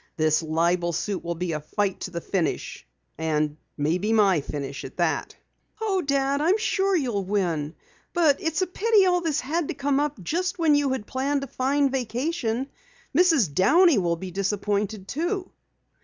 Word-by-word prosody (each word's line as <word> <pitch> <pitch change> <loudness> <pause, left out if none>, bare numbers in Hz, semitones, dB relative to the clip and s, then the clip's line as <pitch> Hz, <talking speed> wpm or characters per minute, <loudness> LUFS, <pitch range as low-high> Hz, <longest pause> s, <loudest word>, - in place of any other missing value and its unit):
"This 155 0 +2
libel 170 +2 +1
suit 190 +4 -2
will 170 0 -3
be 175 +1 -3
a 155 - -2
fight 195 +6 -2
to - - -5
the 170 -2 -5
finish. 180 -3 -2 0.3
And 155 -2 0 0.2
maybe 175 +9 0
my 195 -7 +4
finish 140 -1 -5
at - - -9
that!" - - -1 0.4
"Oh, 405 -4 0
Dad, 275 -1 0
I'm 355 +7 +3
sure 395 -3 +1
you'll 240 - 0
win. 175 -6 -1 0.4
But 315 -5 +3
it's 325 +3 0
a - - +1
pity 410 +3 +3
all 360 -1 +3
this 320 -4 0
had 310 +4 -1
to - - -4
come 280 0 +1
up 295 -4 -1
just 360 - -1
when 325 -3 +3
you 290 -1 +2
had 260 -5 -2
planned 275 +3 -1
a - - -5
fine 275 +2 +1
vacation. 255 0 -2 0.5
Mrs. 315 - +4
Downey 300 - +5
will 170 -2 +1
be 185 +2 -7
disappointed, 200 +1 -2
too." 350 - -2
245 Hz, 170 wpm, -25 LUFS, -, 0.5 s, Downey